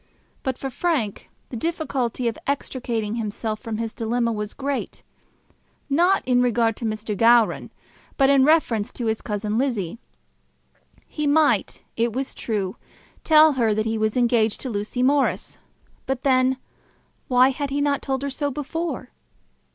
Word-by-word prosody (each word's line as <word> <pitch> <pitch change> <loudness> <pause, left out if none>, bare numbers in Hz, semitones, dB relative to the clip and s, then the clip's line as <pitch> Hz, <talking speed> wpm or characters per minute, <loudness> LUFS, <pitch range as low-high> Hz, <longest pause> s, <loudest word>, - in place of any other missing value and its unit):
But 260 -2 -2
for 270 - -5
Frank 260 - -1 0.2
the - - -7
difficulty 260 -5 -2
of 230 - -1
extricating 240 -5 -2
himself 215 0 -3
from 225 -3 -5
his 225 0 -3
dilemma 235 +1 0
was 210 -1 -4
great, 280 0 -4 0.9
not 350 +7 +3
in 250 -1 +4
regard 235 -2 +2
to 235 - -5
Mr. 215 -1 -3
Gowran, 230 +1 +4 0.5
but 270 - +5
in 275 -1 +5
reference 265 -9 +2
to 240 - -4
his 220 0 -1
cousin 210 +1 -2
Lizzie. 230 -7 -2 1.1
He 300 -1 -3
might, 305 +1 +2
it 230 0 0
was 265 +2 -3
true, 200 -5 -3 0.5
tell 310 0 +7
her 230 -5 +1
that 215 0 0
he 225 0 -1
was 215 +2 0
engaged 235 -3 +2
to 260 - -4
Lucy 210 +4 -2
Morris; 280 +1 +1 0.5
but 265 -1 -2
then 260 -1 +3 0.7
why 255 +1 +5
had 280 +1 -3
he 280 +1 -1
not 285 -1 +1
told 265 -1 -2
her 280 - -2
so 285 +1 -1
before? 295 -1 -4
245 Hz, 150 wpm, -23 LUFS, 220-275 Hz, 1.1 s, tell